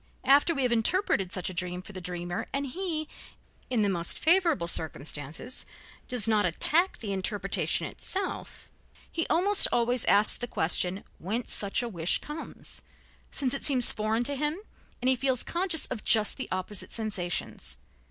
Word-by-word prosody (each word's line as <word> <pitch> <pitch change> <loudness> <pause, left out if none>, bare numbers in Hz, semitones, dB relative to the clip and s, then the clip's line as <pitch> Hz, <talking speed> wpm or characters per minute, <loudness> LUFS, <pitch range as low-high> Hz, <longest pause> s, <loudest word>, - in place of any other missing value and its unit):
After 285 +5 +4
we 275 - 0
have 250 - +1
interpreted 225 - +2
such 185 0 -1
a - - -9
dream 180 0 -3
for 210 - -11
the 185 - -6
dreamer 175 0 -4
and 280 +1 -2
he, 315 +1 -3 0.6
in 240 -4 +1
the - - +2
most 170 -3 0
favorable 330 - +3
circumstances 155 - -2 0.4
does 245 -4 0
not 215 -2 +3
attack 315 - +2
the 205 -3 -4
interpretation 195 +2 -1
itself, 385 -1 -5 0.4
he 330 - -1
almost 395 +4 +4
always 240 0 +2
asks 205 +1 +5
the 245 - -5
question 180 0 0 0.2
whence 225 +7 -1
such 200 +4 +2
a - - -2
wish 170 -6 0
comes, 300 +2 -8 0.5
since 260 -3 0
it 275 - -3
seems 255 -4 +4
foreign 215 +2 0
to 285 +3 -1
him 300 +3 -1 0.5
and 255 - +3
he 260 - +4
feels 255 -1 +2
conscious 345 -2 +1
of 215 - -6
just 215 -2 +3
the - - -5
opposite 185 +2 -4
sensations. 200 - -3
230 Hz, 160 wpm, -28 LUFS, 185-285 Hz, 0.6 s, asks